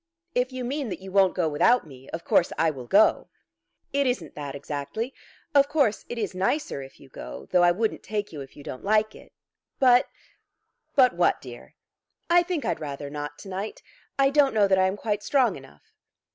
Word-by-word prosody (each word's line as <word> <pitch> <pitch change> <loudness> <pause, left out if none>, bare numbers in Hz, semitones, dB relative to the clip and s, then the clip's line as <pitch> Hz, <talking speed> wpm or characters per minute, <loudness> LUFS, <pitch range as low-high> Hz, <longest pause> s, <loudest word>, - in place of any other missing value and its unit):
"If 250 +1 0
you 255 -1 -5
mean 275 0 -3
that - - -5
you 190 0 -9
won't 190 -1 +4
go 175 -3 +1
without 165 +11 +3
me, 135 -3 -14
of 165 - -6
course 170 - +3
I 160 0 +3
will 130 -4 -9
go." 205 - +4 0.7
"It 280 -1 +2
isn't 195 - -2
that 145 -2 -6
exactly. 145 - -4 0.4
Of 280 0 +5
course 280 -8 +1
it 240 - -5
is 210 -4 -2
nicer 195 - -1
if 135 0 -12
you 140 - -15
go; - - -9
though 180 - +4
I 175 - +6
wouldn't 215 +5 0
take 210 -4 -4
you 145 - -6
if 135 - -12
you 145 - -11
don't 130 - -8
like 215 +1 +2
it. - - -15 0.5
But 250 -2 +5 0.5
" - - -50
"But 255 -3 +6
what, 175 0 +2
dear?" 120 -2 -12 0.6
"I 350 0 +7
think 345 -3 -3
I'd - - -1
rather 140 -1 -6
not 145 0 -6
to - - -11
night. 195 +3 -5 0.3
I 275 0 +4
don't 280 -4 +3
know 205 -2 +4
that 190 -1 +3
I 185 - +4
am 190 +2 -2
quite 210 -1 -2
strong 250 -6 +2
enough." 105 - -16
195 Hz, 210 wpm, -26 LUFS, 150-250 Hz, 0.7 s, I